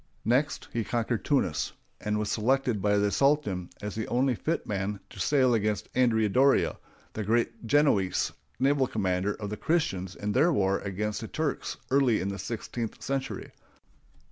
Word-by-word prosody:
Next 130 Hz, +7 st, +1 dB
he 115 Hz, -, 0 dB
conquered 120 Hz, 0 st, -1 dB
Tunis, 90 Hz, -, 0 dB, 0.3 s
and 105 Hz, 0 st, -1 dB
was 105 Hz, -1 st, -1 dB
selected 120 Hz, -1 st, +1 dB
by 105 Hz, +1 st, +3 dB
the 100 Hz, 0 st, +2 dB
sultan 135 Hz, -12 st, +1 dB
as 105 Hz, -1 st, -3 dB
the 110 Hz, -, -3 dB
only 130 Hz, +2 st, +2 dB
fit 160 Hz, +8 st, -2 dB
man 100 Hz, 0 st, -2 dB
to -, -, -11 dB
sail 130 Hz, -4 st, +3 dB
against 105 Hz, -2 st, 0 dB
Andrea 115 Hz, -4 st, +3 dB
Doria, 135 Hz, +7 st, +3 dB, 0.4 s
the 110 Hz, -, -3 dB
great 115 Hz, +2 st, 0 dB
Genoese 110 Hz, -9 st, +3 dB, 0.3 s
naval 135 Hz, 0 st, +3 dB
commander 95 Hz, -2 st, 0 dB
of 105 Hz, -2 st, -6 dB
the 105 Hz, -, -3 dB
Christians 95 Hz, -, -1 dB
in 105 Hz, 0 st, -3 dB
their 145 Hz, +10 st, +4 dB
wars 100 Hz, -8 st, +1 dB
against 105 Hz, +2 st, -2 dB
the 110 Hz, -, -5 dB
Turks 155 Hz, +4 st, -2 dB
early 130 Hz, -5 st, +4 dB
in 95 Hz, -, -2 dB
the 100 Hz, 0 st, -5 dB
sixteenth 115 Hz, +3 st, -4 dB
century. 135 Hz, -1 st, -3 dB
110 Hz, 165 wpm, -28 LUFS, 100-135 Hz, 0.4 s, their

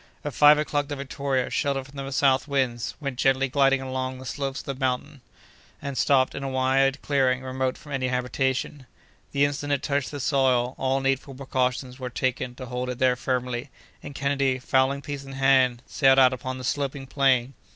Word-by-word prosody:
At 145 Hz, -, -3 dB
five 150 Hz, 0 st, +7 dB
o'clock 145 Hz, -1 st, -1 dB
the 145 Hz, -, -4 dB
Victoria, 140 Hz, -1 st, -2 dB
sheltered 140 Hz, -2 st, -1 dB
from 140 Hz, +1 st, -16 dB
the 135 Hz, -, -6 dB
south 135 Hz, 0 st, +2 dB
winds, 130 Hz, -5 st, -1 dB
went 140 Hz, -4 st, -5 dB
gently 135 Hz, 0 st, +3 dB
gliding 135 Hz, 0 st, +3 dB
along 130 Hz, 0 st, -3 dB
the 130 Hz, -, -10 dB
slopes 135 Hz, +1 st, -3 dB
of -, -, -20 dB
the 140 Hz, -, -3 dB
mountain, 130 Hz, +1 st, -3 dB, 0.6 s
and 140 Hz, -1 st, -5 dB
stopped 130 Hz, -1 st, +3 dB
in -, -, -5 dB
a 135 Hz, -, -3 dB
wide 135 Hz, +1 st, +2 dB
clearing 130 Hz, -2 st, +1 dB
remote 130 Hz, 0 st, -2 dB
from 150 Hz, -3 st, -13 dB
any 130 Hz, -2 st, -1 dB
habitation. 130 Hz, +2 st, -2 dB, 0.4 s
The 140 Hz, 0 st, +3 dB
instant 145 Hz, 0 st, -2 dB
it 140 Hz, -, -1 dB
touched 140 Hz, -1 st, -1 dB
the 145 Hz, -, -6 dB
soil, 130 Hz, -3 st, +2 dB
all 135 Hz, +1 st, +1 dB
needful 135 Hz, 0 st, -1 dB
precautions 130 Hz, -1 st, -2 dB
were 125 Hz, -1 st, -4 dB
taken 125 Hz, 0 st, -2 dB
to 130 Hz, -, -8 dB
hold 125 Hz, +1 st, -4 dB
it 125 Hz, -, -4 dB
there 130 Hz, -1 st, +3 dB
firmly; 125 Hz, +1 st, -2 dB, 0.3 s
and 145 Hz, -, -9 dB
Kennedy, 140 Hz, -1 st, +1 dB
fowling 130 Hz, +2 st, +1 dB
piece 145 Hz, -1 st, -5 dB
in 135 Hz, 0 st, -10 dB
hand, 135 Hz, -2 st, +3 dB
sallied 135 Hz, -2 st, +3 dB
out 130 Hz, -1 st, +6 dB
upon 130 Hz, +1 st, -5 dB
the 130 Hz, -, -8 dB
sloping 140 Hz, +1 st, -2 dB
plain. 135 Hz, -2 st, +2 dB
135 Hz, 195 wpm, -25 LUFS, 130-140 Hz, 0.6 s, five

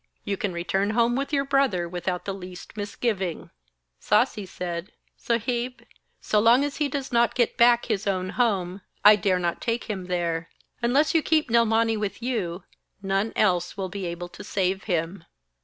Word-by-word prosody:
You 200 Hz, -, -1 dB
can 195 Hz, 0 st, -2 dB
return 190 Hz, +3 st, -1 dB
home 235 Hz, +1 st, +3 dB
with 275 Hz, +2 st, -2 dB
your 275 Hz, -2 st, +1 dB
brother 270 Hz, -11 st, +1 dB
without 180 Hz, +1 st, -3 dB
the 195 Hz, -, -2 dB
least 180 Hz, -1 st, -10 dB
misgiving.' 205 Hz, -4 st, -3 dB, 0.5 s
Sasi 205 Hz, -3 st, +1 dB
said: 175 Hz, 0 st, -5 dB, 0.2 s
'Saheb, 240 Hz, +2 st, -2 dB, 0.4 s
so 210 Hz, -, +1 dB
long 235 Hz, +5 st, +5 dB
as 290 Hz, 0 st, -3 dB
he 295 Hz, -2 st, 0 dB
does 275 Hz, 0 st, -4 dB
not 235 Hz, -1 st, +3 dB
get 240 Hz, -3 st, +1 dB
back 240 Hz, -1 st, +5 dB
his 215 Hz, -3 st, -2 dB
own 185 Hz, -1 st, -1 dB
home, 195 Hz, -6 st, 0 dB, 0.2 s
I 210 Hz, +1 st, +10 dB
dare 195 Hz, -2 st, +1 dB
not 175 Hz, -1 st, -2 dB
take 230 Hz, 0 st, -1 dB
him 195 Hz, -5 st, -5 dB
there. 170 Hz, -2 st, -2 dB, 0.3 s
Unless 270 Hz, +6 st, +2 dB
you 325 Hz, -, +4 dB
keep 310 Hz, -5 st, +1 dB
Nilmani 225 Hz, -1 st, +3 dB
with 205 Hz, -2 st, -3 dB
you, 195 Hz, -8 st, -2 dB, 0.4 s
none 195 Hz, +3 st, 0 dB
else 180 Hz, -4 st, +1 dB
will 190 Hz, -1 st, -3 dB
be 190 Hz, -1 st, -4 dB
able 170 Hz, +1 st, -5 dB
to 205 Hz, -, -11 dB
save 195 Hz, -1 st, -1 dB
him.' 170 Hz, -1 st, -2 dB
205 Hz, 175 wpm, -25 LUFS, 180-235 Hz, 0.5 s, I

